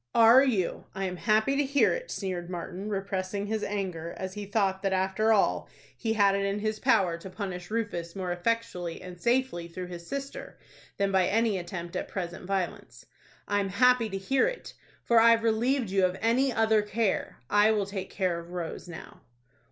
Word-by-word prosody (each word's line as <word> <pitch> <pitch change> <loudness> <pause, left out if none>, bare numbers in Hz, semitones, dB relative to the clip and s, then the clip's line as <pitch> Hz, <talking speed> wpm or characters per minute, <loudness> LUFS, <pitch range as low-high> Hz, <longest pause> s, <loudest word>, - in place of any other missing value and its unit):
"Are 230 +3 +8
you? 215 -10 0
I 195 - -2
am 180 -1 -4
happy 220 +7 +2
to 290 - +2
hear 280 0 +3
it," - - -5
sneered 180 -3 -4
Martin, 180 +3 -5
repressing 195 0 -2
his 215 0 -2
anger, 180 -5 -3
as 185 0 -5
he 205 0 -6
thought 195 -2 0
that, 195 -1 0
after 190 +4 +1
all, 210 -3 +2 0.3
he 220 -1 -1
had 200 -2 +4
it 200 0 0
in 200 +1 0
his 215 +1 -2
power 195 -10 +2
to 190 - -9
punish 185 -2 -6
Rufus 205 -7 -3
more 185 -2 -3
effectually 175 -2 -2
and 180 -1 -10
safely 240 -8 +1
through 180 +1 -7
his 170 -1 -8
sister 275 0 -6 0.4
than 200 -1 +1
by 190 -2 +3
any 220 -2 +1
attempt 175 0 -6
at - - -2
present 175 -1 -5
violence. 190 -2 -3 0.4
"I'm 205 -1 0
happy 250 +2 +4
to 195 - -3
hear 265 - +2
it, - - -6 0.3
for 235 -1 +4
I've 230 0 +5
relieved 230 0 +1
you 195 -1 +2
of 185 0 +1
any 255 +4 +2
other 220 -2 +3
care. 210 -1 -1
I 205 +5 +4
will 210 -2 +1
take 195 -1 -5
care 180 -3 -1
of 170 0 -11
Rose 175 0 -5
now." 175 -2 -10
200 Hz, 190 wpm, -28 LUFS, 185-225 Hz, 0.4 s, Are